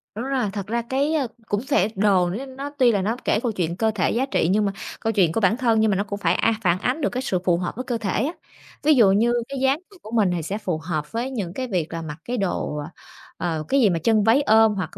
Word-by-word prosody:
Đúng 230 +4 -4
rồi, 265 -5 0
thật 200 -2 -5
ra 235 +2 -1
cái 270 +6 -1 0.3
cũng 205 -1 -1
sẽ 265 -7 +2
đồ 190 -3 +3
n 260 +8 -6
nó 280 +1 -4
tuy 250 -3 +5
là 200 -3 +1
nó 215 +5 -1
kể - - +2
câu 240 - 0
chuyện 175 -5 -2
cơ 220 +1 +2
thể 200 -5 0
giá 250 +3 +1
trị 265 - 0
nhưng 210 +1 +2
mà 200 - 0 0.3
câu 225 - -1
chuyện 185 -6 +3
của 195 - 0
bản 205 +3 +3
thân, 230 -4 +2
nhưng 220 -1 +3
mà 195 - +1
nó 200 - +1
cũng 205 -1 -6
phải, - - +2
a, 225 - +2
phản 180 -1 +2
ánh 255 +9 -1
được 285 - +1
cái 250 - -3
sự 185 -7 0
phù 175 -2 +3
hợp 180 0 -4
với 255 - -4
cơ 245 -2 -2
thể 210 0 -1
á. 305 - -1 0.5
Ví 305 +1 +5
dụ 220 -7 +6
như 230 +5 +3 0.2
cái 275 -1 -4
dáng 270 +3 +2
người 395 - -16
của 215 - -11
mình 215 -6 +2
thì 170 - -3
sẽ 195 +6 -3
phù 185 -6 -2
hợp 155 -3 -3
với 235 +3 -2
những 200 -9 -4
cái 255 +4 -4
việc 175 -7 -2
là 165 - -3
mặc 155 -2 -7
cái 245 +1 -2
đồ, 185 -6 -2 0.6
ờ, 160 -3 -2
cái 275 - +2
gì 215 - +5
mà 170 -2 0
chân 215 +4 +2
váy 225 +6 +4
ôm 220 -4 +4
hoặc 185 -2 -5
215 Hz, 290 wpm, -23 LUFS, 185-245 Hz, 0.6 s, dụ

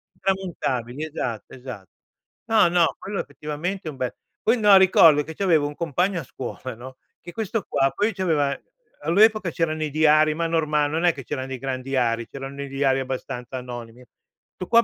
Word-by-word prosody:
Intramontabili, 155 -9 -2
esatto, 125 -8 -5
esatto. 125 -8 -9 0.6
No, 220 -5 +4
no, 170 -1 +3
quello 195 0 -4
effettivamente 160 +5 -5
è - - -2
un 140 - -13
bel 125 -2 -3 0.3
poi 230 +3 +3
no, 205 -2 +7
ricordo 165 -5 +6
che 160 +1 -9
c'avevo 165 -7 +2
un 145 - -7
compagno 170 +3 0
a - - -9
scuola, 130 0 -7
no, 130 +3 -11 0.2
che 175 - -10
questo 220 -1 -2
qua 135 0 +2
poi 210 +1 +1
c'aveva 160 -7 0 0.4
all'epoca 205 +4 +4
c'erano 155 -1 -1
i 155 - -1
diari, 155 0 +4
ma 165 0 -1
norma 155 -3 +1
non 160 +4 -2
è 175 - +5
che 135 - -9
c'erano 130 0 -4
dei 135 -1 -5
grandi 130 0 -4
diari, 115 -3 +1
c'erano 140 +1 -7
i 140 - -6
diari 135 -1 +1
abbastanza 130 -1 -5
anonimi. 120 -1 -8 0.5
'Sto 185 - -6
qua 235 0 +5
150 Hz, 180 wpm, -24 LUFS, 130-175 Hz, 0.6 s, no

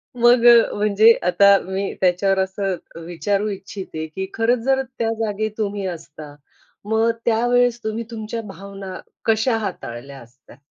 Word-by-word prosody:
मग 240 0 +4 0.3
म्हणजे 210 +2 +5 0.2
आता 200 +3 +6
मी 190 +1 -3
त्याच्यावर 190 +1 +2
असं 190 0 -1 0.3
विचारू 195 +5 -1
इच्छिते 195 -4 -6
की 190 +5 -5
खरंच 230 +2 +1
जर 270 0 +2 0.2
त्या 225 -1 +1
जागी 215 0 -2
तुम्ही 205 -2 -2
असता? 155 -4 -9 0.5
मग 220 +2 +2 0.2
त्यावेळेस 245 +1 +2
तुम्ही 220 +2 -3
तुमच्या 225 0 -5
भावना 195 -1 -8 0.3
कशा 225 +1 +2
हाताळल्या 140 - -6
असत्या? 120 +1 -18
200 Hz, 130 wpm, -21 LUFS, 190-225 Hz, 0.5 s, आता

